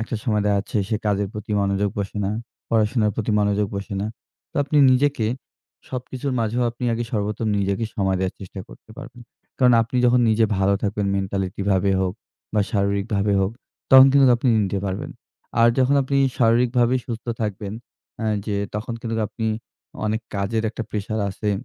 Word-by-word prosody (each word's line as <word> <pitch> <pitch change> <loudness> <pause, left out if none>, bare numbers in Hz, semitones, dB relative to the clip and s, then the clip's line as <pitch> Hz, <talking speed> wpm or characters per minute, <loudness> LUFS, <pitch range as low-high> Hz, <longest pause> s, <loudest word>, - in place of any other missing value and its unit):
একটা 115 - -4
সময় 105 -4 +1
দেখা 105 -1 +2
যাচ্ছে, 100 - -4
সে 110 - 0
কাজের 100 -1 +1
প্রতি 105 0 -6
মনোযোগ 100 0 0
বসে 100 +1 -3
না, 95 - 0 0.4
পড়াশোনার 110 -1 +2
প্রতি 110 -1 -1
মনোযোগ 105 0 +1
বসে 100 +1 -5
না। 105 - -1 0.4
তো, - - -12
আপনি 145 +2 -1 0.2
নিজেকে 135 -3 +2 0.6
সবকিছুর 130 +2 -4
মাঝেও 115 +2 0
আপনি 120 +2 -7
আগে 120 +1 -1
সর্বপ্রথম 105 +1 -1
নিজেকে 100 +2 0
সময় 95 -2 +1
দেয়ার 95 -1 -1
চেষ্টা 95 0 -8
করতে - - -16
পারবেন। 125 -2 -10 0.4
কারণ, 125 -2 +5
আপনি 115 +3 -4
যখন 125 +1 +4
নিজে 110 +1 +3
ভালো 95 +1 +3
থাকবেন 100 -1 -1
মেন্টালিটিভাবে 95 0 0
হোক 95 -1 -1 0.4
বা 105 - +3
শারীরিকভাবে 100 0 0
হোক 95 - +1 0.4
তখন 130 0 +10
কিন্তু 135 -2 +6
আপনি 125 +2 0 0.2
নিতে 100 0 -2
পারবেন। 100 +10 -4 0.5
আর 115 - +7
যখন 130 +2 +3
আপনি 140 +1 -1 0.2
শারীরিকভাবে 120 +1 +3
সুস্থ 115 -1 -6
থাকবেন 105 -1 -3 0.5
অ্যা 110 -1 -1 0.2
যে 105 -2 -1 0.2
তখন 110 +3 -3
কিন্তু 115 -1 -2
আপনি 115 - -4 0.6
অনেক 110 +1 0
কাজের 105 +3 -1
একটা 115 - -5
প্রেশার 110 +1 -3
আছে 105 +2 -2
105 Hz, 170 wpm, -22 LUFS, 100-120 Hz, 0.6 s, তখন